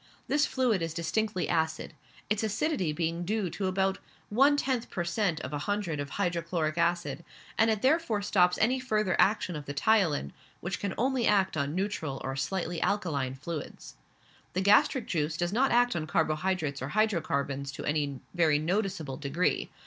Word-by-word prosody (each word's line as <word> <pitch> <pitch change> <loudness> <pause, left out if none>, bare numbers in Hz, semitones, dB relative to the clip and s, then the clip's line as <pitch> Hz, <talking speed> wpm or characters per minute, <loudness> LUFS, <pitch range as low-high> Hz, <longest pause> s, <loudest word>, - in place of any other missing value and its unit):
This 295 +1 +2
fluid 245 -8 +1
is 165 -1 -3
distinctly 195 +2 -1
acid, 160 -1 -1 0.3
its 210 0 0
acidity 220 - 0
being 165 +2 -2
due 200 -1 -1
to 195 - -2
about 190 +1 0 0.3
one 275 +7 +4
tenth 255 -4 -1
per 175 - -2
cent 170 -1 0
{of - - -6
a 145 - -2
hundred} 200 -7 -1
of 145 0 -4
hydrochloric 170 -3 -1
acid, 170 0 0 0.3
and 225 0 +4
it 215 -2 0
therefore 260 -7 +2
stops 180 -3 +3
any 250 +4 +2
further 215 -7 0
action 195 -4 +2
of 150 -2 -7
the 145 - -5
ptyalin, 165 - +2 0.3
which 175 +3 -4
can 200 -1 -2
act - - -9
only 255 0 +1
on 160 -8 +1
neutral 170 -8 -2
or 135 0 -3
slightly 170 +4 -2
alkaline 145 -10 0
fluids. 150 +2 -7 0.6
The 185 - 0
gastric 210 +5 +4
juice 155 -2 -1
does 175 +2 -1
not 265 +4 +3
act 245 -1 +3
on 155 -2 -2
carbo 155 0 +2
hydrates 155 -4 -2
or 130 - -3
hydrocarbons 140 -8 0
to - - -6
any 145 -3 -1
very 165 -4 +3
noticeable 170 -3 -2
degree. 155 +4 0
180 Hz, 170 wpm, -29 LUFS, 155-210 Hz, 0.6 s, one